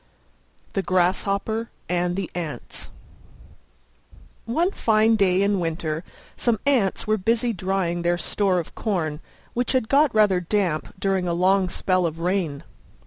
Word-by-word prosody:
THE 195 - 0
GRASSHOPPER 195 +5 0 0.2
AND 175 0 0
THE 195 -2 -4
ANTS 165 -4 -6 1.6
One 330 - +1
fine 220 - +3
day 195 -2 +3
in 200 -1 +2
winter 165 -1 -2 0.3
some 235 -3 0
Ants 245 -10 +2
were 215 0 +2
busy 230 +4 +1
drying 185 -2 -1
their 175 0 +1
store 190 +3 0
of 170 - -4
corn, 165 -8 -2 0.3
which 245 +2 0
had 255 -4 +1
got 285 0 +4
rather 205 -4 +4
damp 175 -4 -1
during 190 -1 0
a 170 - 0
long 185 +1 +3
spell 185 -1 +1
of 160 0 -6
rain. 170 -4 -1
190 Hz, 140 wpm, -24 LUFS, 175-215 Hz, 1.6 s, got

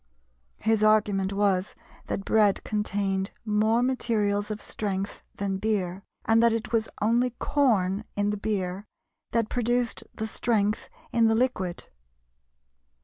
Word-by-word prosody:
His 220 0 +2
argument 205 -3 +3
was 195 -1 +1 0.3
that 195 - -3
bread 210 -3 +3
contained 200 -2 -1 0.2
more 220 +2 +2
materials 210 -5 0
of 215 0 -3
strength 200 -2 -3
than 195 -1 -2
beer, 195 -3 -1 0.2
and 225 0 +4
that 235 -1 +5
it 230 +1 -3
was 225 -2 +1
only 240 +3 +3
corn 210 -8 +2
in 205 0 +1
the 210 - -2
beer 200 -1 -2 0.4
that 230 -2 +1
produced 240 0 0
the 220 - -3
strength 215 -2 0 0.2
in 230 -1 +4
the 225 - +3
liquid. 205 -8 -1
210 Hz, 130 wpm, -27 LUFS, 200-225 Hz, 0.4 s, that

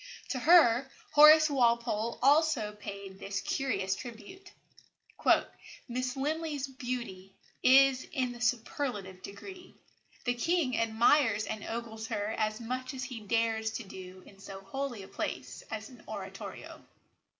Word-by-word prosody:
To 255 - -2
her 270 -5 +5 0.2
Horace 305 +1 +8
Walpole 235 -4 +1
also 285 -6 +3
paid 200 -2 -9
this 200 0 -3
curious 225 -8 -1
tribute: 255 - -10 1.4
"Miss 255 +1 -3
Linley's 295 0 -2
beauty 240 -8 -6 0.3
is 265 0 +5
in 255 -2 -1
the 240 0 -10
superlative 225 -5 -2
degree. 360 - -10 0.5
The 245 - +2
king 290 0 0
admires 225 0 +3
and 215 -1 -5
ogles 225 -1 -5
her 210 -1 -2
as 215 -1 -1
much 255 +3 -4
as 260 - -4
he 245 -2 -6
dares 220 +1 0
to 230 - -4
do 185 -1 -11
in 195 - -17
so 195 0 -9
holy 240 +1 -5
a - - -11
place - - -5
as - - -6 0.2
oratorio." - - -8
235 Hz, 130 wpm, -30 LUFS, 210-270 Hz, 1.4 s, Horace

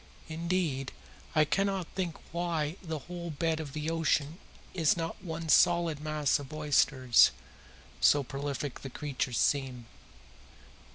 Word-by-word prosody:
Indeed, 160 -5 -2 0.4
I 155 -1 +5
cannot 195 +2 0
think 180 -4 -3
why 170 -2 -1
the 160 -3 -4
whole 175 -1 -6
bed 160 +1 -1
of 145 -4 -6
the 155 +1 -2
ocean 160 0 0 0.3
is 165 -3 +2
not 165 0 -4
one 165 -2 -5
solid 170 -1 +4
mass 150 -2 +1
of 140 -2 -9
oysters, 135 -4 +4 0.7
so 145 -1 +5
prolific 140 0 -4
the 135 - -7
creatures 130 -4 -3
seem. 130 -4 0
155 Hz, 125 wpm, -30 LUFS, 140-170 Hz, 0.7 s, I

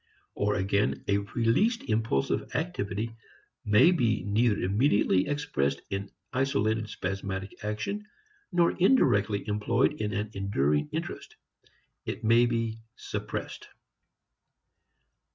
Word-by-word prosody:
Or 105 0 0
again 100 +1 0
a 100 0 +3
released 120 - +1
impulsive 110 - -1
activity 115 - -2 0.5
may 105 +12 +6
be 115 - +1
neither 105 +2 +2
immediately 100 -2 +2
expressed 145 - -1
in 100 0 -3 0.2
isolated 110 -4 0
spasmodic 95 0 -5
action, 110 - -3 0.4
nor 175 -2 +3
indirectly 105 - +3
employed 105 +6 +1
in 105 -1 -1
an 105 +1 -3
enduring 75 -7 0
interest. - - -5 0.7
It - - -5
may 115 +2 +5
be 115 -1 -2 0.2
"suppressed." - - -6
105 Hz, 100 wpm, -28 LUFS, 100-120 Hz, 0.7 s, may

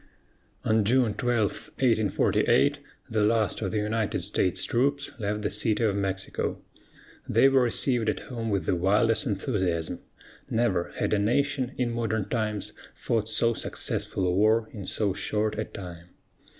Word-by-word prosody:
On 110 -1 +3
June 120 0 +3
12, 120 -4 +1 0.2
1848, 110 -6 +2 0.3
the 110 -1 0
last 110 0 +1
of 95 - -1
the 100 - -2
United 105 0 -1
States 90 - 0
troops 140 +3 0
left 105 0 -2
the - - 0
City 110 0 +2
of 105 -3 +2
Mexico. 95 -1 -2 0.7
They 115 +5 +5
were 135 -1 +4
received 120 -1 +1
at 105 - -2
home 115 -3 -5
with 100 -3 0
the - - +1
wildest 105 +6 +2
enthusiasm. 95 - -1 0.5
Never 110 -7 0
had - - -1
a 105 - +3
nation, 130 +4 +1
in 125 -2 0
modern 110 -3 -1
times, 110 -3 -2 0.2
fought 110 -2 -1
so 115 +1 +2
successful 95 -3 -2
a 90 - +2
war 110 +3 +3
in 100 -4 -7
so 100 -3 0
short 105 +2 -1
a 110 - -1
time. 85 -3 -9
110 Hz, 150 wpm, -27 LUFS, 100-115 Hz, 0.7 s, They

